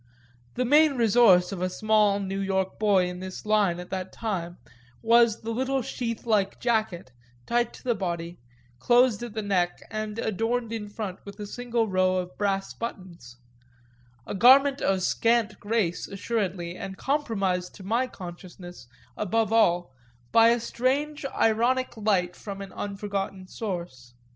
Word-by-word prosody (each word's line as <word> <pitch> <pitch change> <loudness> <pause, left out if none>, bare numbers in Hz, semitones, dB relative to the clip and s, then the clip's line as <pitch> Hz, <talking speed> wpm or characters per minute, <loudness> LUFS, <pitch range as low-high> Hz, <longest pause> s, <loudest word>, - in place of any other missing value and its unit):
The 250 - 0
main 300 +3 +5
resource 215 -6 +5
of 190 -3 -5
a 185 - 0
small 210 0 +2
New 195 0 -3
York 190 -1 -1
boy 200 -4 +3
in 180 0 -6
this 185 +2 -8
line 205 -5 +2
at 180 - -9
that 190 -1 -4
time 180 -6 -4 0.5
was 230 -1 +4
the 225 - -4
little 260 +2 -1
sheath 230 -2 -4
like 205 -4 +1
jacket, 215 - -1 0.3
tight 240 0 +1
to - - -14
the 245 - +1
body, 175 -4 -4 0.4
closed 240 - +3
at 240 -3 -7
the 220 - -2
neck 180 -3 0
and 215 0 -4
adorned 225 +2 -1
in 210 -2 -5
front 205 -3 -6
with 200 +1 -11
a 210 - -5
single 235 +1 -2
row 185 -1 +2
of 180 0 -4
brass 195 -1 -1
buttons 175 - -8 0.9
a - - -5
garment 270 +6 +6
of 190 -1 +1
scant 230 +1 +1
grace 205 -5 -1
assuredly 195 -4 -3
and 190 0 -7
compromised 200 -11 -1
to 195 - -11
my 230 +6 0
consciousness, 175 - -10 0.3
above 225 +2 0
all, 175 -9 +3 0.4
by 230 0 +6
a 235 +1 +3
strange 275 +5 -1
ironic 240 +4 +2
light 195 -5 0
from 200 -2 -8
an 195 -1 -8
unforgotten 195 -2 -4
source. 170 - -6
205 Hz, 155 wpm, -26 LUFS, 185-230 Hz, 0.9 s, garment